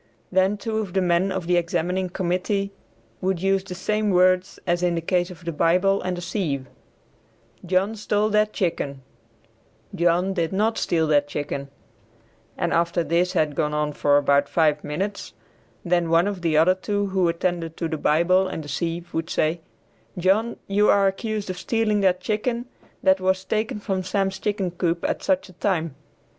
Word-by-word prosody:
Then 190 +2 +2
two 220 +1 -2
of 200 -5 -4
the 195 - +2
men 180 +2 +2
of 190 -2 -3
the 175 +1 +2
examining 180 +2 -1
committee 190 +3 -1 0.5
would 190 -1 0
use 195 +1 +1
the 185 -2 -7
same 210 +3 0
words 185 0 +3
as 175 0 +1
in 175 -1 +1
the - - 0
case 175 +1 0
of 170 -2 -12
the 170 - -1
Bible 180 +5 +2
and 180 -1 -3
the - - -5
sieve, 155 -8 -2 1.0
"John 190 +4 +1
stole 210 0 0
that 210 0 +2
chicken," 145 -9 -2 0.9
"John 175 +1 +2
did 170 -1 -1
not 220 +3 +1
steal 165 -2 +1
that 145 -1 +3
chicken," 140 -1 -4 0.9
and - - 0
after 170 +1 +1
this 175 +2 +1
had 155 -5 +1
gone 150 +1 -1
on 150 0 -1
for 145 0 +3
about 140 0 +3
five 150 -3 +2
minutes, 195 +7 -4 0.5
then 175 -1 +1
one 165 +3 +4
of 200 -3 -4
the 165 -3 +1
other 165 +4 +5
two 205 +2 -2
who 185 -2 +3
attended 170 -1 -2
to 165 - -2
the 160 - -3
Bible 175 +6 +3
and 160 - -5
the 145 - -9
sieve 170 +4 -3
would 165 0 -2
say, 160 +2 0 0.6
"John, 200 +6 +1
you 205 +1 +2
are 200 -1 +5
accused 205 0 -2
of 180 - -7
stealing 215 +1 +1
that 185 -2 +2
chicken 235 +4 -1 0.4
that 190 0 +4
was 190 0 +1
taken 215 +1 -1
from 195 -2 -2
Sam's 190 0 -1
chicken 200 -3 -1
coop 170 -1 -1
at - - -2
such 190 0 0
a 185 - -15
time." 170 -5 -1
185 Hz, 180 wpm, -24 LUFS, 170-195 Hz, 1.0 s, other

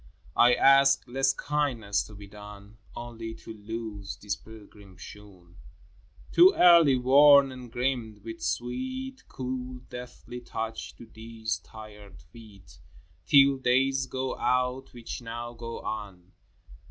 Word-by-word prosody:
I 120 +1 +5
ask 135 0 +5
less 135 +2 +1
kindness 135 -9 -1
to 105 - -13
be 100 0 -11
done, 105 +1 -13
— - - -24
Only 115 -1 -7
to 110 - -11
loose 105 -1 -7
these 100 -1 -4
pilgrim 105 -4 -15
shoon, 95 -4 -14 0.7
(Too 370 +3 +6
early 170 -6 +6
worn 140 +2 +6
and 125 -2 -11
grimed) 120 -4 -3
with 115 0 -8
sweet 260 - -4
Cool 125 -1 -6
deathly 125 0 -9
touch 115 -1 -6
to - - -13
these 110 -4 -5
tired 105 0 -13
feet, 95 0 -17 0.5
Till 140 -1 +6
days 135 +1 +1
go 130 0 -4
out 125 +1 -1
which 120 0 -8
now 120 +1 -7
go 115 0 -8
on. 95 -4 -7
120 Hz, 130 wpm, -27 LUFS, 105-130 Hz, 0.7 s, Too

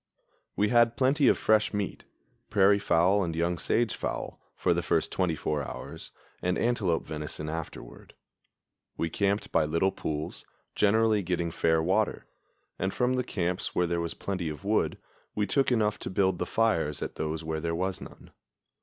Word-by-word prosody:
We 105 +1 +2
had 120 0 +4
plenty 135 +2 +3
of - - +5
fresh 110 -1 +2
meat 100 -2 -3 0.4
prairie 100 -1 +5
fowl 95 +2 +3
and 85 -2 -3
young 85 +1 0
sage 115 -2 +1
fowl - - -4
for - - +2
the - - 0
first - - 0
twenty 90 -4 0
four 75 -1 -2
hours, 70 - -7 0.3
and 90 0 0
antelope 110 -8 +1
venison 75 0 -5
afterward. 80 -6 -7 0.8
We 80 - -1
camped 100 +2 0
by 80 - +3
little 85 +5 +1
pools, 75 -3 -4 0.3
generally 110 0 +3
getting 85 -2 -1
fair 80 -1 +2
water; 95 +5 +1 0.5
and 95 - 0
from 125 +3 +1
the 125 0 0
camps 90 -6 -2
where 90 - +3
there 85 0 -1
was 85 -1 -4
plenty 90 -5 -3
of 75 -1 -7
wood 105 +1 +1 0.4
we 105 - +1
took 135 +4 +2
enough 105 -3 +1
to - - -5
build 95 -1 +1
the 90 - -2
fires 85 -10 +1
at - - -5
those 80 +1 -3
where 80 0 -3
there 85 0 -1
was 95 +2 -2
none. - - -12
95 Hz, 170 wpm, -28 LUFS, 80-105 Hz, 0.8 s, of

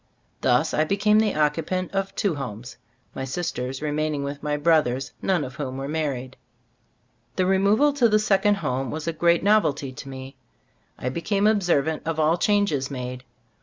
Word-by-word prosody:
Thus - - +2
I 155 - +3
became 205 +5 +3
the 215 -2 +1
occupant 160 +4 0
of 195 0 -2
two 200 -4 0
homes, 125 -4 -7 0.4
my 135 - -5
sisters 130 -2 -4
remaining 150 -1 -1
with 140 +1 -5
my 150 0 -1
brothers, 140 -5 +2
none 185 -5 +1
of 130 -2 -6
whom 130 0 -4
were 135 0 -4
mar 155 0 -1
ried. 130 +1 -8 1.0
The 185 - +1
removal 200 +10 +3
to 250 -5 +3
the 215 - +4
second 205 -1 +3
home 130 -8 -2
was 155 +4 -5
a 165 - 0
great 170 +1 +2
novelty 150 -10 +2
to 135 - -9
me. 130 0 -9 0.6
I 125 - -3
became 195 +8 -1
observant 175 -8 +2
of 165 -1 -1
all 160 +3 +2
changes 200 -11 +1
made. 125 -2 -6
155 Hz, 170 wpm, -24 LUFS, 135-195 Hz, 1.0 s, the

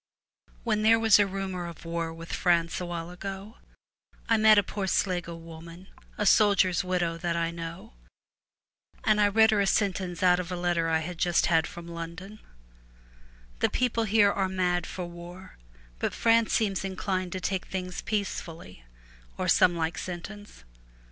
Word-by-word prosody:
When 215 -3 0
there 225 +1 +5
was 225 -2 +5
a 205 - +4
rumour 190 -2 -4
of 170 -1 -11
war 165 0 -3
with 165 0 -9
France 170 -1 +1
a 180 - -4
while 170 0 -5
ago, 195 +4 -8 0.7
I 230 - +4
met 215 -1 +6
a 205 - +5
poor 195 0 -4
Sligo 175 -3 -1
woman, 165 +2 -12 0.3
a 210 - -1
soldier's 195 -4 +4
widow, 175 -2 -1
that 170 0 -1
I 170 0 -1
know, 165 - -8 1.1
and 215 -1 +3
I 205 - +5
read 220 +2 +4
her 210 -2 +2
a 200 - +1
sentence 190 -3 -1
out 180 -1 +5
of 180 0 -5
a - - -2
letter 175 -2 0
I 160 0 +1
had 170 +1 -6
just 175 -2 +2
had 160 -1 +2
from 170 0 -10
London: 170 +5 -8 1.2
■ - - -27
The - - +2
people 230 -3 0
here 205 -1 +4
are 195 -1 -1
mad 180 -2 0
for 180 - -5
war, 175 - -11 0.4
but - - -2
France 230 -1 +3
seems 200 -4 0
inclined 185 -1 -3
to 185 - -3
take 185 0 -3
things 185 -1 -5
peacefully,' 165 - -5 0.5
or - - -2
some 180 -1 +4
like 165 +1 -2
sentence. 185 - -8
180 Hz, 170 wpm, -27 LUFS, 170-200 Hz, 1.2 s, met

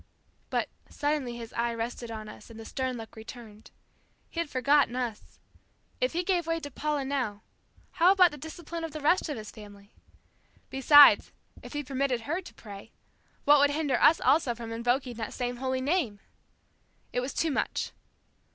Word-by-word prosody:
But - - 0 0.2
suddenly 290 -5 -2
his 230 -1 -9
eye 235 0 -1
rested 235 +1 -4
on 215 -1 -6
us 210 - -12
and 225 -1 -11
the 225 - -9
stern 260 0 -3
look 225 0 -10
returned. 220 -1 -11 0.6
He 335 - -4
had 335 -3 -1
forgotten 265 -1 +3
us. 240 -4 -5 0.6
If - - 0
he 350 +2 0
gave 350 -3 0
way 330 0 0
to 285 -3 -8
Paula 295 0 -2
now, 250 -7 -2 0.5
how 360 +1 +5
about 365 -3 +6
the 295 - -9
discipline 330 +2 -7
of 325 - -5
the 310 - -5
rest 310 +4 +2
of 290 - -3
his 215 -1 -8
family? 205 -1 -14 0.8
Besides, 285 +2 +7 0.3
if - - -10
he 295 0 -2
permitted 265 -2 -1
her 330 +10 -2
to 370 - -13
pray, 205 0 -11 0.5
what 290 0 +7
would 285 0 +5
hinder 290 -3 0
us 325 - +6
also 280 -6 +3
from 230 -1 -7
invoking 245 +1 -1
that 225 -2 -5
same 245 0 -3
holy 260 0 -1
Name? 265 - 0 0.9
It - - +1
was 255 +2 -3
too 325 - +1
much. 270 - -1
260 Hz, 180 wpm, -28 LUFS, 230-300 Hz, 0.9 s, Besides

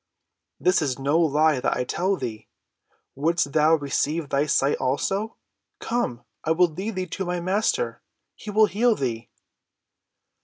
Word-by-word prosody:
"This 180 -1 +3
is 135 -5 -1
no 140 +4 +1
lie 155 -2 +3
that - - 0
I - - 0
tell 185 +9 0
thee. 110 - -6 0.7
Wouldst 155 0 0
thou 155 +1 +5
receive 150 +1 -1
thy 140 +2 +1
sight 140 0 +2
also? 195 - -1 0.4
Come, 125 - -2 0.2
I - - -3
will 175 +1 +4
lead 190 +7 -5
thee 185 0 -2
to 185 +2 -4
my 180 0 -2
Master. 210 - -1 0.3
He 215 - -10
will 215 +1 +5
heal 225 +3 +2
thee." 115 - -3
160 Hz, 150 wpm, -24 LUFS, 140-190 Hz, 0.7 s, thou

